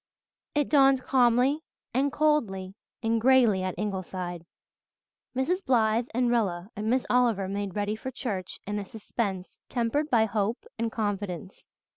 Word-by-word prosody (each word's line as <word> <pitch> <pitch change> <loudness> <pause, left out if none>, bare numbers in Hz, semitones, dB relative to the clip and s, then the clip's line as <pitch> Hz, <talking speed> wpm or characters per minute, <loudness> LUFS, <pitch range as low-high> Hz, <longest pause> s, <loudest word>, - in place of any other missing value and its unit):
It 290 -2 +2
dawned 270 -3 +5
calmly 255 +3 +3 0.3
and 275 +3 +2
coldly 225 -13 +1 0.3
and 225 0 +1
greyly 240 -6 +5
at 185 -1 -3
Ingleside. 185 -4 -4 0.9
Mrs. 355 +9 0
Blythe 230 -3 +2
and 245 +1 +1
Rilla 195 -6 0
and 215 +2 -2
Miss 255 +2 +2
Oliver 235 -6 +2
made 200 -1 -3
ready 205 +1 -1
for 240 +4 -6
church 215 -8 -4
in 205 +1 -2
a - - -4
suspense 200 -2 -4
tempered 250 +6 0
by 230 -4 +4
hope 215 - -1
and 230 0 0
confidence. 205 -3 -4
225 Hz, 140 wpm, -28 LUFS, 195-255 Hz, 0.9 s, dawned